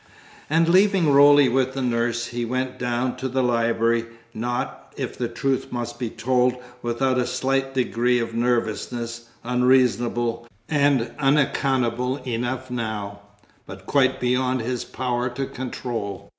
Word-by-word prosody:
And 165 +2 +3
leaving 185 -3 +4
Roly 145 0 +7
with 130 +1 +1
the 135 - -2
nurse, 120 -1 0
he 120 0 -3
went 130 +2 -3
down 125 +1 -1
to 130 - -3
the 130 +1 0
library; 115 -1 +1 0.3
not, 115 - -4
if - - -4
the 120 - -2
truth 130 +3 -2
must 120 -1 -4
be 120 -3 -2
told, 125 +2 +1 0.3
without 125 +2 0
a 125 - 0
slight 135 +1 -1
degree 125 -1 +1
of 115 -1 -2
nervousness, 115 0 -2
unreasonable 120 -1 +1 0.2
and 140 -6 +2
unaccountable 130 -3 +1
enough 125 +1 -3
now, 110 -4 -4 0.5
but 95 0 -10
quite 130 0 +2
beyond 125 0 +1
his 125 +1 -2
power 125 -1 -2
to 130 +3 -3
control. 125 -6 -5
125 Hz, 135 wpm, -23 LUFS, 120-130 Hz, 0.5 s, Roly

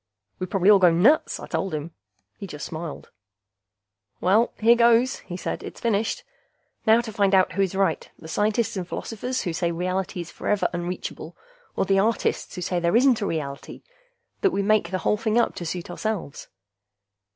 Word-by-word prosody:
"We'd 185 - -4
probably 195 +1 +4
all 200 - +7
go 180 -2 +6
nuts!" 205 - +3
I - - -7
told 190 -4 -2
him. 155 +2 -5 0.4
He 200 - -8
just 150 -3 -7
smiled. 160 -1 -7 1.1
"Well, 210 +6 +3
here 230 +2 +5
goes," 235 +2 +4
he 175 - -8
said. - - -4
"It's - - -9
finished. 225 -2 0 0.6
Now 225 +2 +6
to 225 -2 -8
find 200 -1 +3
out 185 -1 +4
who 190 +2 -1
is 190 -1 0
right, 195 0 0
the 160 - -12
scientists 210 +6 0
and 185 -3 -4
philosophers 250 +7 -4
who 175 - -2
say 170 0 0
reality 185 +2 -2
is 170 - -9
forever 210 -1 0
unreachable, 175 +1 -5 0.4
or - - +1
the 195 0 +3
artists 220 +2 0
who 180 - -5
say 180 0 -1
there 170 +3 +1
isn't 245 -1 +4
any 200 - -1
reality 140 -3 -5 0.6
that 390 - +4
we 200 - -1
make 210 -4 +2
the 185 - -1
whole 210 - +3
thing 220 +1 0
up 235 - +2
to 175 - -6
suit 175 +1 -4
ourselves." 205 -6 -4
195 Hz, 185 wpm, -24 LUFS, 175-220 Hz, 1.1 s, all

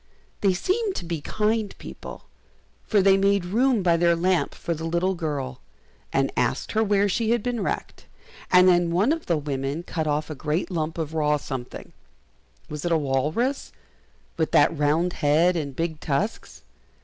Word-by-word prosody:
They 195 -3 +3
seemed 395 - -1
to - - -4
be 165 -2 -3
kind 215 +4 -1
people, - - -9 0.6
for 205 -3 +3
they 195 0 +5
made 200 -1 +2
room 230 +3 +2
by 170 -2 +3
their 170 0 +3
lamp 180 +1 +1
for 170 - -3
the 160 0 -7
little 170 +3 0
girl, 145 -7 -4 0.5
and - - +1
asked - - -1
her 220 - +2
where 205 -1 +2
she 220 +3 0
had 235 -2 +1
been 245 -3 -2
wrecked, - - -4 0.4
and 180 0 +7
then 175 -1 +4
one 190 - +2
of 330 0 -2
the 170 - +2
women 140 +1 -3
cut 160 -3 -3
off 150 +1 -1
a - - -2
great 155 +6 -2
lump 160 -1 -2
of 160 -1 -3
raw 150 -2 +2
something 130 -4 -7 0.7
was 150 -1 -6
it 175 - -1
a 165 - +4
walrus, 155 - -1 0.7
with 160 -1 0
that 145 +3 +5
round 155 +4 +1
head 160 +5 +4
and 140 -5 -3
big 165 -1 -2
tusks? 160 +10 -3
170 Hz, 175 wpm, -24 LUFS, 150-200 Hz, 0.7 s, and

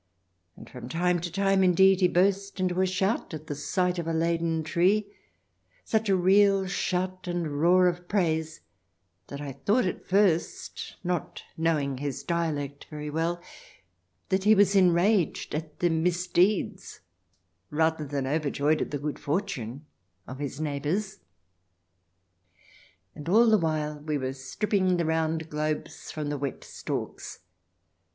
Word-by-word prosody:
And - - -12
from 125 -1 -9
time 175 +2 +1
to 175 +1 -5
time, 195 +1 +2
indeed, 190 +1 +5
he 180 - +6
burst 195 +2 +1
into 185 0 +1
a 190 - +3
shout 190 -1 -1
at 150 -1 -6
sight 180 +5 -1
of 165 - -4
a 165 - -1
laden 165 0 0
tree 195 +6 +1 0.3
— 90 0 -39
such 220 -1 +2
a 195 - +4
real 195 +1 +4
shout 185 0 -2
and 165 -5 -2
roar 180 +2 +5
of 175 0 -2
praise 160 - 0 0.7
that 140 - -7
I 145 -1 -5
thought 200 - +1
at 180 - -4
first, 190 -4 0
not 175 -2 -3
knowing 150 -5 0
his 140 -1 -4
dialect 150 -5 -2
very 150 -1 -6
well, 170 +3 -1 0.9
that 190 0 +1
he 215 +2 +6
was 205 0 +4
enraged 185 0 +3
at 155 0 -5
the 175 - +3
misdeeds 180 - 0 0.7
rather 160 0 +1
than 140 -2 -3
overjoyed 150 +1 0
at - - -2
the 145 - -2
good 145 +1 -4
fortune 145 - -3 0.4
of 130 +1 -9
his 140 -1 -5
neighbours.... 155 +7 -2 1.9
And 150 +2 -7
all 230 +5 +6
the 215 - +5
while 155 -2 -1
we 150 0 -2
were 130 -1 -3
strip 135 +10 -5
ping 185 -3 +3
the 170 - 0
round 160 0 0
globes 155 0 -3
from 150 -2 -4
the 145 -1 -3
wet 140 -2 -4
stalks. - - -6
170 Hz, 145 wpm, -27 LUFS, 150-185 Hz, 1.9 s, he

